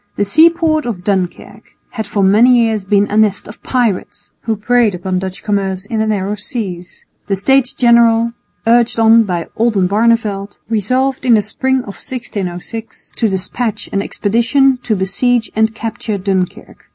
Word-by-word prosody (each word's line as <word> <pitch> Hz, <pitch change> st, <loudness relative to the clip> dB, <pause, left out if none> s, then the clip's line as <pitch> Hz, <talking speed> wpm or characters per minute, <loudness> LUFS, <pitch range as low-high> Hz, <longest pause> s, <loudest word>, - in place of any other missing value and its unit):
The 205 Hz, -, 0 dB
seaport 315 Hz, -, +3 dB
of 190 Hz, -7 st, -5 dB
Dunkirk 200 Hz, +2 st, -4 dB, 0.2 s
had 220 Hz, -4 st, -5 dB
for 205 Hz, -1 st, -1 dB
many 230 Hz, +6 st, +5 dB
years 220 Hz, -4 st, +1 dB
been 200 Hz, +1 st, +2 dB
a -, -, -1 dB
nest 215 Hz, -2 st, +1 dB
of 210 Hz, -, -12 dB
pirates, 205 Hz, -4 st, -2 dB
who 225 Hz, -1 st, 0 dB
preyed 225 Hz, -1 st, +1 dB
upon 185 Hz, +1 st, -2 dB
Dutch 190 Hz, 0 st, -6 dB
commerce 195 Hz, -2 st, -2 dB
in 220 Hz, +1 st, -3 dB
the 220 Hz, -, 0 dB
narrow 205 Hz, -1 st, -1 dB
seas. 195 Hz, -5 st, -5 dB, 0.2 s
The 195 Hz, -, 0 dB
States 255 Hz, +6 st, +2 dB
General, 235 Hz, -1 st, +3 dB, 0.3 s
urged 235 Hz, +1 st, +3 dB
on 225 Hz, 0 st, +5 dB
by 175 Hz, -4 st, -3 dB
Oldenbarneveldt, 210 Hz, -1 st, +1 dB
resolved 255 Hz, +5 st, 0 dB
in 245 Hz, -3 st, +4 dB
the 210 Hz, -, +2 dB
spring 260 Hz, +5 st, -1 dB
of 200 Hz, -5 st, -9 dB
1606 220 Hz, -2 st, -6 dB
to 225 Hz, -, +1 dB
despatch 205 Hz, +4 st, -3 dB
an 195 Hz, -, +1 dB
expedition 235 Hz, +7 st, +1 dB
to 225 Hz, -3 st, -1 dB
besiege 225 Hz, +5 st, 0 dB
and 220 Hz, 0 st, +1 dB
capture 225 Hz, -2 st, -4 dB
Dunkirk. 190 Hz, -2 st, -3 dB
220 Hz, 155 wpm, -15 LUFS, 195-235 Hz, 0.3 s, many